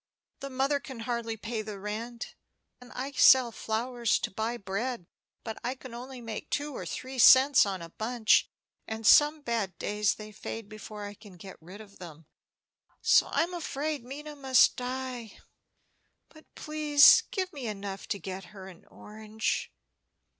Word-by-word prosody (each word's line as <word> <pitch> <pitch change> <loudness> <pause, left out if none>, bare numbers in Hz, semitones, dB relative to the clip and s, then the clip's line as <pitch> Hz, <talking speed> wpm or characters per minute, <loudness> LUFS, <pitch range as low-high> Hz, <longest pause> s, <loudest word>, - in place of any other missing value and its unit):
The 275 - -6
mother 270 +2 0
can 260 -4 -9
hardly 230 -1 -3
pay 225 +1 -4
the 210 -1 -7
rent, 220 +4 -6 0.5
and 250 - -14
I 265 +3 -4
sell 260 -3 +6
flowers 235 +1 -1
to - - -3
buy 220 +4 -3
bread; 205 +1 -4 0.4
but 220 -1 -6
I 245 +2 -2
can 260 -2 -12
only 250 +1 -8
make 225 -2 -7
two 290 -1 -3
or - - -6
three 260 0 -6
cents 260 -1 +7
on 190 -3 -4
a 165 - -9
bunch, 220 +4 +2 0.4
and 220 0 -6
some 295 +7 +6
bad 225 -7 -2
days 210 0 0
they 215 0 -10
fade 215 +1 -7
before 210 0 -9
I 205 - -7
can 205 -3 -15
get 190 +1 -12
rid 185 +6 -11
of 200 -2 -16
them; 165 -3 -11 0.8
so - - +5
I'm 340 +2 0
afraid 300 -4 -3
Minna 295 +4 -8
must 265 -2 +4
die. 250 -3 -5 0.9
But 310 -1 -18
please 300 -2 +6
give 375 -2 -3
me 270 -5 -6
enough 200 -2 -6
to 205 - -2
get 190 0 -7
her 190 +1 -12
an 180 -3 -14
orange." 215 +1 -4
230 Hz, 160 wpm, -29 LUFS, 210-265 Hz, 0.9 s, cents